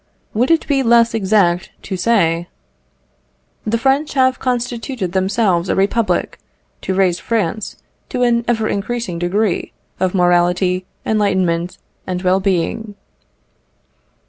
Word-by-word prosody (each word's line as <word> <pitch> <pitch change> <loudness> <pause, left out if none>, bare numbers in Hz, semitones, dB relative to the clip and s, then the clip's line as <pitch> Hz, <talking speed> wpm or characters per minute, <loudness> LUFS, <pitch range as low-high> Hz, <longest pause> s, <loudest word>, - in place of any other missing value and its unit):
Would 240 +4 +1
it 330 -1 +3
be 275 -2 +2
less 235 -1 +4
exact 190 -4 +2
to 195 - -4
say 175 -5 +1 1.2
"The 225 +2 +1
French 275 +6 +1
have 260 -1 +3
constituted 245 -4 -2
themselves 190 -1 +1
a - - +1
Republic, 205 +4 0 0.4
to 190 - -2
raise 185 -2 +2
France 215 0 -2 0.3
to 250 - -1
an 235 -1 +2
ever 225 -2 +1
increasing 205 -3 -3
degree 185 +2 -1 0.3
of 185 0 0
morality, 180 +1 +2 0.2
enlightenment, 185 -5 0 0.3
and 180 -1 -2
well 185 +1 +3
being." 195 +3 -1
200 Hz, 120 wpm, -18 LUFS, 180-235 Hz, 1.2 s, less